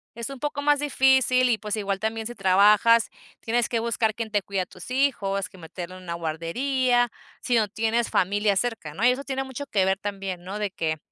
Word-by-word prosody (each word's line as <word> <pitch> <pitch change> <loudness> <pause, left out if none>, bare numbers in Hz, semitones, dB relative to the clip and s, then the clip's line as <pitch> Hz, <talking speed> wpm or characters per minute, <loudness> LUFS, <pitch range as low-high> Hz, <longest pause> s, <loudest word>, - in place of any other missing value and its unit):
es 235 +1 -5
un 275 -2 -8
poco 290 -1 -3
más 290 0 +3
difícil 265 -3 +3
y, 225 - +2
pues 210 -1 -3
igual 200 -2 -2
también 220 0 -2
si 240 - -8
trabajas, 210 +4 +5 0.3
tienes 235 0 0
que 235 - 0
buscar 225 -1 0
quién 225 -2 -5
te 205 -1 +1
cuide 195 0 -2
a - - -3
tus 180 +6 -12
hijos, 200 -8 0
que 190 - -17
meterlo 175 +1 -8
en 185 - -13
una 170 -1 -4
guardería, 245 - 0 0.3
sí 245 - 0
no 215 -2 +3
tienes 225 +3 0
familia 205 +2 +1
cerca, 225 -9 -2
¿no?, 215 +9 -1
y 250 - +7
eso 265 +3 -3
tiene 270 -1 -3
mucho 265 +2 -7
que 195 -6 +1
ver 190 0 +1
también, 195 -3 -5
¿no?, 195 +3 -6
de 205 -2 -2
que, 160 -3 -2
220 Hz, 220 wpm, -25 LUFS, 195-245 Hz, 0.3 s, y